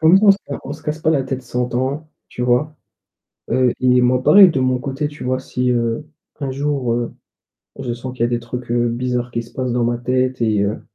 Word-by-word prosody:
Comme 160 +4 +6
ça 210 - +1
on 200 - +9
se 195 - -4
ca 140 - -5
on - - -5
se 155 +1 -10
casse 150 0 -3
pas 160 - +2
la 145 -4 +2
tête 130 0 -4
100 125 0 -3
ans, 135 +5 -2 0.2
tu 125 - -5
vois? 125 +5 +1 0.8
Heu, 130 -2 +2
i 125 0 +4
et - - +4
moi 125 +1 +3
pareil 195 +3 +8
de 145 -5 -1
mon 130 0 +2
côté, 135 +3 -3
tu 145 0 -10
vois, 130 +1 0
si 125 -1 -1
heu, 115 +3 -1 0.4
un 135 -2 -2
jour, 140 -3 -1
heu, 120 0 -2 0.7
je 120 - -3
sens 125 +2 -7
qu'il 120 - +1
y - - -1
des 120 -1 0
trucs, 120 +1 -7
heu, 120 0 +2
bizarres 125 0 -2
qui 115 0 -2
se 115 - -17
passent 130 -1 -2
dans 120 0 +1
ma 120 0 0
tête 130 +1 -1
et 110 -3 +2
heu 100 +2 -2
125 Hz, 250 wpm, -19 LUFS, 120-140 Hz, 0.8 s, on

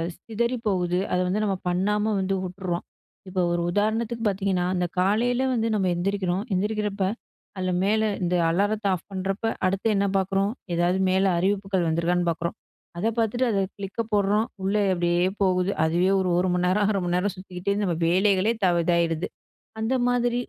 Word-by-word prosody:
சிதறி 235 +6 -2
போகுது. 180 -3 +1
அதை 180 - +2
வந்து 200 +4 0
நம்ம 195 -2 0
பண்ணாம 210 +4 +1
வந்து 190 +1 0
உட்ர்றோம். 180 -1 -4 0.4
இப்போ 185 0 -1
ஒரு 175 0 0
உதாரணத்துக்கு 220 +3 0
பார்த்தீங்கன்னா, 195 -2 0
அந்த 180 0 0
காலையில் 235 +7 +2
வந்து 230 -1 0
நம்ம 195 -3 +1
எந்திரிக்கிறோம். 190 +1 -1
எந்திரிக்கிறப்ப, 210 0 -1 0.5
அதில 185 -1 -1
மேலே 215 +2 +2 0.2
இந்த 180 0 +1
அலாரத்தை 205 +4 +1
ஆஃப் 170 - -10
பண்ணுறப்போ, 195 +3 -2 0.2
அடுத்து 195 +3 0
என்ன 200 0 +2
பார்க்குறோம், 195 +1 +1 0.2
ஏதாவது 175 +2 +2
மேலே 190 +1 +3
அறிவிப்புகள் 195 0 0
வந்துருக்கான்னு 170 +2 +1
பார்க்குறோம். 170 +1 -3 0.4
அதை 210 +6 +1
பார்த்துட்டு, 235 +3 +1
அதை 200 -2 +1 0.2
கிளிக்கப் 205 +3 -4
போடுறோம். 210 +2 +2 0.2
உள்ளே 205 +2 +1
அப்படியே 175 0 +1 0.2
போகுது. 185 0 +2
அதுவே 175 +4 +2
ஒரு 185 -1 0
1 185 +1 +2
மணி 180 0 +1
நேரம், 205 +3 +2
0.5 200 - 0
மணி 175 0 0
நேரம் 195 +2 0
சுத்திக்கிட்டே 185 +1 -4
நம்ம 180 -4 0
வேலைகளே 195 +4 +3
இதா 190 -4 +2
இதாவிடுது. 170 -1 +1 0.5
அந்த 225 +4 +1
மாதிரி 245 0 +1
195 Hz, 160 wpm, -25 LUFS, 180-210 Hz, 0.5 s, மேலே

